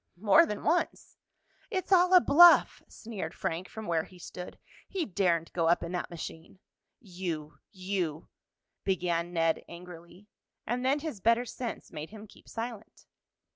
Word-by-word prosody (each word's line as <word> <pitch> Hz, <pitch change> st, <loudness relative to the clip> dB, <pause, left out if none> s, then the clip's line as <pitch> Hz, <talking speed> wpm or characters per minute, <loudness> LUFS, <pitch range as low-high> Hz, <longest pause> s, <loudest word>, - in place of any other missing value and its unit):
"More 265 Hz, -, +5 dB
than 210 Hz, -, -5 dB
once." 340 Hz, +3 st, -1 dB, 0.5 s
"It's 375 Hz, 0 st, -3 dB
all 365 Hz, 0 st, +6 dB
a -, -, +10 dB
bluff!" 345 Hz, +3 st, +7 dB
sneered 220 Hz, -4 st, -7 dB
Frank 170 Hz, +3 st, -3 dB
from 220 Hz, -1 st, -8 dB
where 165 Hz, -3 st, 0 dB
he 185 Hz, -, -16 dB
stood. 180 Hz, +1 st, -9 dB, 0.3 s
"He 375 Hz, -4 st, -2 dB
daren't 175 Hz, -4 st, 0 dB
go 165 Hz, -2 st, +1 dB
up 170 Hz, -, +3 dB
in 170 Hz, -, -5 dB
that 180 Hz, -1 st, -3 dB
machine." 165 Hz, +1 st, -8 dB, 0.4 s
"You 175 Hz, -7 st, -6 dB
you 185 Hz, -5 st, -3 dB, 0.3 s
" -, -, -57 dB
began 175 Hz, -2 st, -1 dB
Ned 165 Hz, -2 st, +1 dB
angrily, 175 Hz, +2 st, -12 dB, 0.4 s
and 245 Hz, +2 st, -2 dB
then 275 Hz, +3 st, +2 dB
his 300 Hz, -11 st, -6 dB
better 230 Hz, +3 st, +3 dB
sense 240 Hz, -2 st, -6 dB
made 155 Hz, -2 st, -7 dB
him 215 Hz, 0 st, -11 dB
keep 210 Hz, -, -18 dB
silent. 225 Hz, -2 st, -7 dB
190 Hz, 155 wpm, -29 LUFS, 170-235 Hz, 0.5 s, a